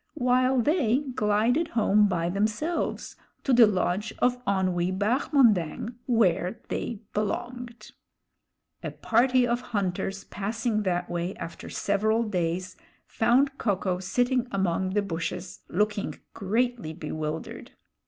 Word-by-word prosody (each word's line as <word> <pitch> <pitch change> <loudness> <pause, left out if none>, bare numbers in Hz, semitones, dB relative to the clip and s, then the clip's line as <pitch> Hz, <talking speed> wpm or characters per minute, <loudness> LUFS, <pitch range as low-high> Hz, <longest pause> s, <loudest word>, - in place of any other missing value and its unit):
while 255 -1 +3
they 260 -3 +2 0.2
glided 225 +9 +2
home 210 -1 +4
by 170 -3 0
themselves 215 - -1 0.3
to 270 - +2
the 235 -2 +8
lodge 200 +2 0
of 245 0 +1
Onwee 185 -2 0
Bahmondang, 225 - +2
where 195 -4 +2
they 225 -3 -3
belonged. 235 +2 -4 0.9
A - - -3
party 250 +2 +2
of 240 +1 0
hunters 195 -3 -2
passing 215 +2 -2
that 180 -3 -1
way 175 +2 -3
after 165 - -8
several 215 +3 +1
days, 185 -3 -2 0.3
found 270 +5 +2
Ko 205 -4 +1
ko 185 -1 -2
sitting 245 +6 0
among 190 -1 0
the 205 - +2
bushes, 180 0 -4
looking 210 +2 -1 0.2
greatly 225 -3 -1
bewildered. 155 -1 -5
210 Hz, 115 wpm, -27 LUFS, 185-245 Hz, 0.9 s, the